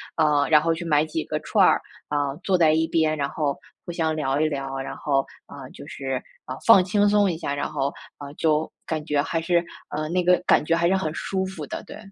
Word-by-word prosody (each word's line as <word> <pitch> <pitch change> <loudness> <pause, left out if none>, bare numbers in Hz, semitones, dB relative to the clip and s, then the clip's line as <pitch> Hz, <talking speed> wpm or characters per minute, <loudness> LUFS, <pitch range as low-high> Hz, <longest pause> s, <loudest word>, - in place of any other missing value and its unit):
呃， 150 -3 +3
然 150 -1 +6
后 165 0 +1
去 165 +1 -6
买 150 -2 +3
几 160 0 -4
个 155 - -2
串 - - +3
儿， - - +3 0.3
啊， 145 -2 -1
坐 190 -2 +1
在 165 -3 +5
一 160 +1 +2
边， 155 -1 +1
然 140 - -1
后 145 -3 -2 0.3
互 - - -5
相 160 -2 -1
聊 140 -2 -1
一 155 - +3
聊， 135 -2 -4
然 135 - -5
后， 135 -2 0 0.2
呃， 135 -2 -10
就 - - -11
是， 135 -2 -4 0.2
啊， 130 - -5
放 230 -5 +8
轻 205 +3 +2
松 205 -1 +3
一 165 - -2
下， 140 - -3
然 145 - -3
后， 140 -2 -1 0.3
呃， 145 -1 -8
就 155 -1 +1
感 155 -2 -3
觉 145 -2 +1
还 165 +2 -2
是， 170 +1 +1 0.2
呃， 155 +1 -3
那 180 +2 0
个 180 0 +4
感 - - +4
觉 165 - 0
还 170 +1 +2
是 190 - +3
很 160 -5 -2
舒 190 +2 -2
服 185 -5 -6
的， - - -6
对。 - - -10
155 Hz, 255 characters per minute, -24 LUFS, 145-170 Hz, 0.3 s, 放